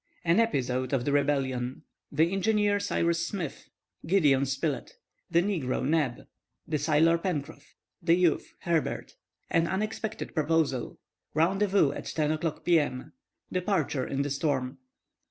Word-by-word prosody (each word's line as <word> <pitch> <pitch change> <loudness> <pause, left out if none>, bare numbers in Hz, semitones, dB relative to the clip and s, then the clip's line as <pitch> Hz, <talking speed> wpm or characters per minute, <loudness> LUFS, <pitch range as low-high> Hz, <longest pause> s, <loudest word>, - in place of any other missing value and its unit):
AN 170 +5 +4
EPISODE 130 - 0
OF 125 -3 +1
THE 145 - +1
REBELLION 135 -3 0 0.3
THE 160 +4 +2
ENGINEER 205 +1 +2
CYRUS 170 -4 0
SMITH—GIDEON 155 -4 -1
SPILETT—THE 140 +4 -2
NEGRO 170 -11 -1
NEB—THE 150 +1 -2
SAILOR 160 +3 +3
PENCROFF—THE 165 0 -2
YOUTH, 175 -3 +1
HERBERT—AN 165 0 -2
UNEXPECTED 215 +3 -3
PROPOSAL—RENDEZVOUS 160 - 0
AT - - -6
10 155 -1 0
O'CLOCK 155 0 -3
P.M.—DEPARTURE 170 - -1
IN 140 0 -1
THE 145 - -3
STORM. 135 -2 -1
160 Hz, 100 wpm, -28 LUFS, 140-180 Hz, 0.3 s, AN